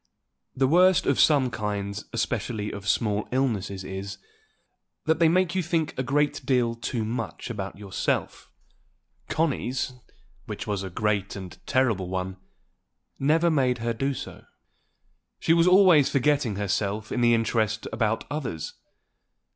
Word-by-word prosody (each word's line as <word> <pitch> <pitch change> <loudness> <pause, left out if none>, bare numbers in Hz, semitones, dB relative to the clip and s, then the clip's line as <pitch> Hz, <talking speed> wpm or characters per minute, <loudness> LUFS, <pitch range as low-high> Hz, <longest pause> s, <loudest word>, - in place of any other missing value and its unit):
The 135 - +2
worst 180 +5 +5
of - - +2
some 140 -5 +4
kinds 105 -2 -3
especially 110 -2 -2
of 100 -1 -7
small 105 0 +1
illnesses 110 -7 -1
is, 95 +1 -6 0.9
that 160 0 +2
they 165 -1 +5
make 180 0 +2
you 190 - +1
think 165 -2 -1
a - - -1
great 145 +2 0
deal 125 -3 +2
too 115 -1 -3
much 115 -2 -4
about 100 -4 -5
yourself. 100 -2 -2 0.8
Connie's, 135 -5 -1 0.5
which - - -5
was 100 -2 -2
a 95 - -5
great 100 +1 -1
and 95 -3 -8
terrible 110 -9 +1
one, 95 0 -3 0.8
never 160 +5 +3
made 130 -5 +2
her 115 0 -2
do 135 +4 -1
so. - - -8 0.9
She 165 - +3
was 170 +1 +4
always 180 -6 +6
forgetting 140 -5 +1
herself 105 +1 -2
in - - -1
her 120 - +5
interest 110 -2 +1
about 110 0 0
others. 130 - -4
115 Hz, 140 wpm, -26 LUFS, 100-145 Hz, 0.9 s, always